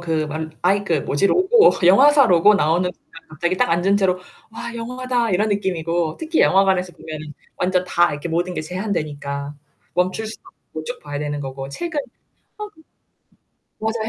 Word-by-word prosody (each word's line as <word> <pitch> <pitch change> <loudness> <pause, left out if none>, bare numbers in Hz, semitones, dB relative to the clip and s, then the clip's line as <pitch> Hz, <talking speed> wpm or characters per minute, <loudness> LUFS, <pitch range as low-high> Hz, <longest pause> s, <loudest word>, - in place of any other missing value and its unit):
그 160 -2 -1
말 155 +1 -5
아이 200 +3 +2
그 165 -6 0
뭐지? 145 +9 +1
로고 405 - +5
영화사 275 +10 +6
로고 185 +2 +5
나오는 175 0 +2
순간 165 - -17
갑자기 175 +4 -2
딱 - - +2
앉은 180 +4 +2
채로 185 -2 +1 0.3
"와 235 +1 -6
영화다." 245 0 -2
이런 205 +4 +1
느낌이고. 175 -5 -1
특히 320 0 -1
영화관에서 190 -2 +3
보면은 155 -1 -9 0.2
완전 180 0 0
다 175 -1 +2
이렇게 145 +3 -5
모든 175 +2 -1
게 - - -2
제한되니까. 150 -6 -4 0.4
멈출 185 +5 0
수 220 - -8 0.3
없고 155 0 -7
쭉 - - -6
봐야 145 -1 -5
되는 145 0 -3
거고 135 0 -6
책은 330 - -4 0.6
어 - - -4 1.2
맞아요. 220 0 -2
180 Hz, 335 characters per minute, -21 LUFS, 155-215 Hz, 1.2 s, 영화사